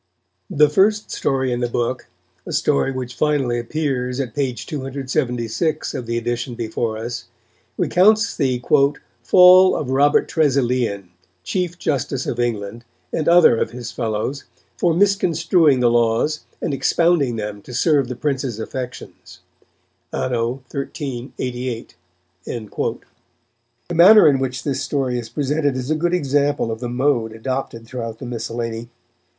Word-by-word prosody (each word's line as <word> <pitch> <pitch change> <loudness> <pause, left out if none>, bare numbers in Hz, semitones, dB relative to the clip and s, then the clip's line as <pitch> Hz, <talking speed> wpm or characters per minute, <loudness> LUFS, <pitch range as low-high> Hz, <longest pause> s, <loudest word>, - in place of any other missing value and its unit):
The 150 +1 +4
first 205 +7 +2
story 130 -2 0
in 120 - -1
the 120 -1 -1
book, 120 +2 -2 0.4
a - - -5
story 70 - +1
which 130 -2 -5
finally 135 -3 0
appears 125 -1 -2
at 125 -5 -3
p. 135 -1 0
276 135 +1 -3
of 125 -4 -5
the 115 0 -1
edition 120 +1 -3
before 110 -1 -3
us, 115 +2 -5 0.5
recounts 215 +5 +3
the 130 -3 0 0.6
"Fall 185 0 +7
of 130 -3 -3
Robert 145 +2 +3
Tresilian, 125 - 0 0.3
Chief 180 - -2
Justice 135 -4 -2
of 120 - -3
England, 115 -1 -2 0.3
and 155 - 0
other 175 -7 +6
of - - 0
his 120 -1 -7
fellows, 115 +4 -3 0.3
for 170 -2 +1
misconstruing 170 -6 +3
the 120 -1 +4
laws 120 +6 +1 0.2
and 155 - -1
expounding 140 -1 +2
them 105 -2 -5
to - - -12
serve 140 +1 +2
the 125 - -5
Prince's 135 -3 -2
affections, 125 +2 -8 0.7
Anno 125 +1 -2
1388." 125 -3 -5 0.5
The 120 - -8
manner 190 +5 +8
in 140 -3 +4
which 130 -1 -3
this 140 -2 -2
story 130 -2 -1
is 115 -2 -8
presented 145 -1 -1
is 130 +3 -3
a - - +2
good 175 +3 0
example 145 -5 0
of 110 - -5
the 120 0 -4
mode 125 -3 0
adopted 115 0 -4
throughout 115 -2 -6
the - - -8
miscellany. 115 -1 -4
130 Hz, 135 wpm, -20 LUFS, 120-150 Hz, 0.7 s, manner